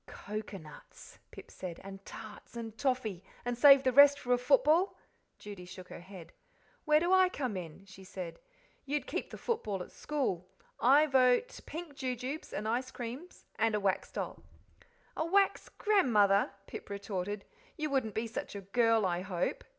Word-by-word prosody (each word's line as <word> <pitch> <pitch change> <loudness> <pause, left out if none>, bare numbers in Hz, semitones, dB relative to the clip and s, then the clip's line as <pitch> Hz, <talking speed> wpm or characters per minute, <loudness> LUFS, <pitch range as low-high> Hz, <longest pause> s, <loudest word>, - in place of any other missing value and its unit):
"Coconuts," 200 -7 -9
Pip - - -12
said, 180 -3 -7
"and 195 0 -9
tarts 215 +2 -10
and 225 -2 -6
toffee, 230 -8 -1 0.2
and 245 0 -1
save 275 +2 +8
the 260 - +3
rest 285 +2 +8
for 250 -3 0
a - - +4
football?" 360 - +3 0.4
Judy 205 -3 -9
shook 180 0 -11
her - - -8
head. 175 -2 -12 0.5
"Where 305 -1 +5
do 345 +3 +2
I 375 -1 +6
come 255 - -3
in?" 180 +1 -7
she 190 0 -13
said. 185 -2 -7 0.4
"You'd 290 +1 -2
keep - - -4
the - - -8
football 210 - -2
at - - -14
school. 245 - -2 0.3
I 280 +5 +6
vote 265 - +3
pink 325 -2 -6
jujubes, 260 +2 -4
and 210 - -3
icecreams, 250 +6 -4
and 225 -1 +2
a - - +1
wax 195 -2 0
doll." - - -5 0.7
"A - - 0
wax 390 +4 +2
grandmother!" 215 - +3 0.2
Pip - - -9
retorted; 200 0 -4 0.3
"you 305 -2 -2
wouldn't 260 -6 0
be 220 - 0
such 220 -2 -5
a 200 - -5
girl, 225 +2 +2
I 175 -1 0
hope." 185 -2 -2
230 Hz, 165 wpm, -32 LUFS, 195-285 Hz, 0.7 s, save